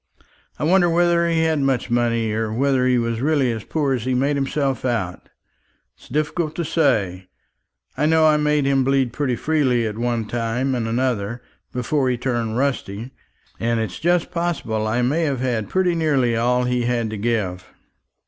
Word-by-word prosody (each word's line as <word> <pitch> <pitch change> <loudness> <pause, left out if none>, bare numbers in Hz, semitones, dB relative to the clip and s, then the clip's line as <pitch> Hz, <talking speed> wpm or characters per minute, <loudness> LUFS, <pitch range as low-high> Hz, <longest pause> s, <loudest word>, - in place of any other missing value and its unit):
I - - -4
wonder 175 +2 +4
whether 170 0 +3
he 165 -1 +2
had 160 -2 +1
much 135 -3 0
money, 115 -2 +1
or 110 0 -1
whether 130 +2 +1
he 125 -1 +3
was 115 -1 -1
really 140 -3 +2
as 110 -2 -5
poor 145 -4 -1
as 125 -4 -2
he 130 +1 0
made 140 +3 +1
himself 135 -2 -1
out. 115 -8 -2 0.7
It's - - -19
difficult 155 +3 -1
to 170 - -2
say. 100 - 0 0.7
I 150 - +1
know 160 0 +4
I 155 -1 +5
made 150 -1 +1
him 135 -1 +2
bleed 135 -2 +1
pretty 135 -4 -1
freely, 130 -4 +1
at 110 0 -4
one 120 -2 -1
time 120 +4 -1
and 120 -3 -1
another, 120 -1 -1 0.3
before 130 +2 0
he 125 - 0
turned 120 -3 -2
rusty; 125 -4 -2 0.5
and 115 0 0
it's 105 -5 -4
just 175 +1 +1
possible 160 -11 -2
I 120 +3 0
may 145 +7 +1
have 140 -4 -1
had 120 -5 -1
pretty 185 -2 +1
nearly 140 -8 +1
all 125 +2 +2
he 125 -1 0
had 120 -2 -1
to 110 - -4
give." 100 -5 -2
125 Hz, 180 wpm, -21 LUFS, 115-150 Hz, 0.7 s, I